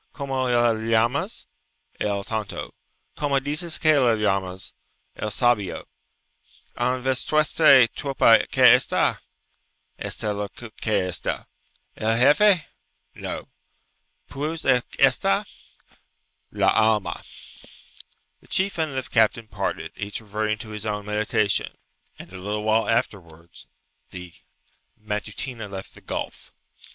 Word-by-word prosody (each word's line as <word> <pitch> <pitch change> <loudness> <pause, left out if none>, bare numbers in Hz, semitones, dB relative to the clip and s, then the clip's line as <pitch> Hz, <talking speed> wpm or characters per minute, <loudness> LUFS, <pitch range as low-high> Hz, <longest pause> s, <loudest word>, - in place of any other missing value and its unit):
"Como 135 -3 -2
le 120 -1 +3
llamas?" 115 - 0 0.5
"El 100 -1 -1
tonto." 105 -3 -5 0.4
"Como 140 -2 +1
dices 155 +4 -1
que 155 -2 +4
le 120 -4 +4
llamas?" 95 -3 -2 0.4
"El 110 - -3
sabio." 105 -4 0 0.9
"En 125 +1 -1
vuestre 140 0 +4
tropa 125 -2 +3
que - - +1
esta?" - - +1 0.8
"Esta 105 +1 -2
lo 100 0 -4
que 110 -3 -3
esta." 90 - -3 0.5
"El 110 +1 0
gefe?" 160 - +5 0.5
"No." - - -6 0.8
"Pues 155 - -4
que 130 -2 +4 0.2
esta?" - - +3 1.0
"La - - +2
alma." 110 -2 +1 1.2
The - - -23
chief 190 -1 0
and 155 -4 -1
the 130 - -1
captain 115 -1 +1
parted, - - -4
each 105 0 -4
reverting 105 0 -2
to 110 +1 -9
his 105 0 -5
own 105 -1 -3
meditation, 105 -1 0 0.4
and 90 - -12
a 95 - -8
little 105 +3 -3
while 110 +1 +2
afterwards 85 -8 -3 0.4
the 90 -2 -10 0.7
Matutina 110 +2 -5
left 95 -1 -8
the - - -15
gulf. - - -6
110 Hz, 115 wpm, -24 LUFS, 105-130 Hz, 1.2 s, gefe